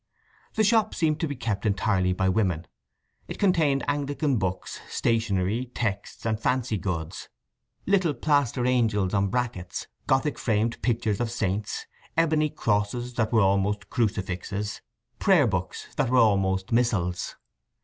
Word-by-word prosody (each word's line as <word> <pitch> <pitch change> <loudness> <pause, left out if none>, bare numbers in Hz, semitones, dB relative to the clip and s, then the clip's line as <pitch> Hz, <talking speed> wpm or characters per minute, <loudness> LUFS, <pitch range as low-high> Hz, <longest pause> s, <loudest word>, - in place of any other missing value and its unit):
The 220 - +3
shop 215 0 +3
seemed 155 -2 +1
to 165 - 0
be 145 - -4
kept 110 -5 -2
entirely 100 -3 +1
by 95 +1 0
women. 95 -4 +1 0.6
It - - -6
contained 160 -8 +2
Anglican 145 -1 0
books, 95 -2 -3
stationery, 110 +1 0
texts, 105 -3 -3
and 110 -1 0
fancy 125 -3 0
goods: 85 -3 -4 0.6
little 185 -6 +2
plaster 140 -2 +1
angels 110 -7 +2
on 100 -1 +2
brackets, 105 -5 -3 0.2
Gothic 135 +2 +1
framed 115 0 0
pictures 110 -3 0
of 120 -1 0
saints, 105 -3 -2 0.3
ebony 155 -2 +3
crosses 115 +2 -1
that 110 -2 0
were 115 -2 +4
almost 100 +1 +1
crucifixes, 100 -1 -2 0.4
prayer 180 -8 +5
books 95 -5 -2
that 135 -5 +1
were 130 - +3
almost 95 -4 +3
missals. 100 -7 0
110 Hz, 135 wpm, -26 LUFS, 100-130 Hz, 0.6 s, prayer